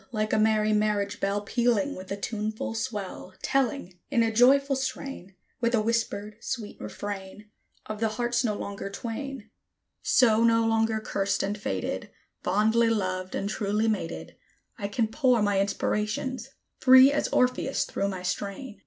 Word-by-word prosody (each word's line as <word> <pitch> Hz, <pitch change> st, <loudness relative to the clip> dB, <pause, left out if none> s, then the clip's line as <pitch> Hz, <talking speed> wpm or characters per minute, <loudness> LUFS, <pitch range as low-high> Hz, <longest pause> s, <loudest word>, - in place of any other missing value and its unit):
Like 215 Hz, -2 st, -1 dB
a -, -, +3 dB
merry 215 Hz, 0 st, +3 dB
marriage 205 Hz, -1 st, 0 dB
bell, 200 Hz, +1 st, 0 dB
Pealing 240 Hz, +5 st, +1 dB
with 185 Hz, +1 st, -9 dB
a 200 Hz, -, -2 dB
tuneful 215 Hz, +1 st, -3 dB
swell, 210 Hz, -5 st, -5 dB
Telling, 270 Hz, -9 st, -1 dB
in 230 Hz, -, +3 dB
a 225 Hz, -1 st, 0 dB
joyful 275 Hz, +4 st, +5 dB
strain, 260 Hz, -7 st, -5 dB, 0.2 s
With 235 Hz, 0 st, +2 dB
a -, -, +3 dB
whispered, 215 Hz, -2 st, -1 dB
sweet 225 Hz, -5 st, -5 dB
refrain, 200 Hz, -, -7 dB, 0.3 s
Of 215 Hz, -1 st, -6 dB
the 225 Hz, -, +2 dB
hearts 240 Hz, +3 st, 0 dB
no 215 Hz, -3 st, 0 dB
longer 200 Hz, -1 st, -5 dB
twain; 230 Hz, +2 st, -6 dB, 0.5 s
So 230 Hz, -3 st, +4 dB
no 230 Hz, 0 st, +4 dB
longer 225 Hz, 0 st, +2 dB
cursed 195 Hz, -2 st, -1 dB
and 200 Hz, +1 st, -1 dB
fated, 95 Hz, -, -3 dB, 0.3 s
Fondly 220 Hz, +5 st, +3 dB
loved 185 Hz, -4 st, -1 dB
and 200 Hz, -, -2 dB
truly 210 Hz, +1 st, 0 dB
mated, 205 Hz, -7 st, -3 dB, 0.4 s
I 200 Hz, -4 st, -4 dB
can 220 Hz, +3 st, 0 dB
pour 245 Hz, -1 st, +2 dB
my 205 Hz, -1 st, +2 dB
inspirations, 215 Hz, +5 st, -1 dB, 0.3 s
free 260 Hz, +1 st, +8 dB
as 290 Hz, -, 0 dB
Orpheus, 255 Hz, +2 st, +1 dB
through 200 Hz, -, -2 dB
my 190 Hz, -2 st, -4 dB
strain. 200 Hz, +5 st, -4 dB
215 Hz, 155 wpm, -27 LUFS, 200-240 Hz, 0.5 s, free